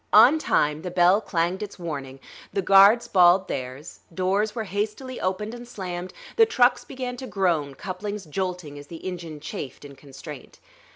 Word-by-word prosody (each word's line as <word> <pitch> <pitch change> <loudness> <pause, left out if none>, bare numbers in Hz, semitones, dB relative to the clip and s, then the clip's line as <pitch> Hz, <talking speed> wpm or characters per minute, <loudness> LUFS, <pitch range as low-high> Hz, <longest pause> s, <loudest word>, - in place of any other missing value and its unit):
On 245 +9 +8
time, 150 - +1
the 180 - -5
bell 180 +3 +4
clanged 180 -1 -1
its 205 -1 -6
warning; 140 -6 -6 0.3
the 195 - -1
guards 200 +5 +6
bawled 180 0 +5
theirs; 130 +5 -6
doors 195 +4 0
were 225 - -2
hastily 210 +6 -4
opened 200 +4 -2
and 240 0 -9
slammed; 185 -5 -6 0.3
the 455 - +7
trucks 250 - +3
began 250 -1 -6
to 260 - -7
groan, 165 - 0
couplings 200 +2 -5
jolting 175 -3 -4
as 145 - -12
the 165 +1 -10
engine 170 -4 -6
chafed 145 -2 -7
in 140 -1 -11
constraint. 135 0 -11
185 Hz, 165 wpm, -25 LUFS, 160-210 Hz, 0.3 s, On